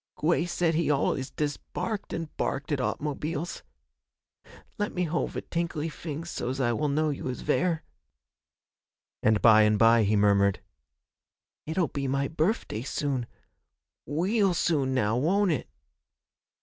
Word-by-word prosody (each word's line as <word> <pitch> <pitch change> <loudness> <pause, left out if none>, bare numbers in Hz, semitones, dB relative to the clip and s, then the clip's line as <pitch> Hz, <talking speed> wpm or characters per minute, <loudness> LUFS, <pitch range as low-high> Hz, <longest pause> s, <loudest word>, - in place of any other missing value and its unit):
'Gwey 170 +2 +1
said 175 -1 +1
he 165 0 +1
al'us 135 -2 +1
dest 145 -1 -2
barked 215 -3 -3
an' 165 -1 -3
barked 140 +3 -2
at 145 - +1
aut'mobiles. 150 +5 -3 1.2
Let 205 - -2
me 180 - +1
hold 170 0 -1
ve - - -3
tinkly 165 -2 -2
fings 160 +1 -6
so's 130 +3 -3
I 120 -3 +2
will 150 +6 0
know 155 +2 +1
you 140 - -5
is 125 - -4
vere.' 165 +1 +1 1.4
And 110 -1 +2
by 110 -2 +8
and 105 0 +4
by 115 +1 +6
he 105 0 +2
murmured, 100 -1 +3 1.1
'It'll 160 -1 0
be 140 -1 -3
my 135 +1 0
birfday 160 - -1
soon 130 -2 -2 0.8
weal 185 - +1
soon 140 -6 +1
now, 110 -2 +1
won't 185 +8 +2
it?' 150 - -2
150 Hz, 140 wpm, -28 LUFS, 125-170 Hz, 1.4 s, by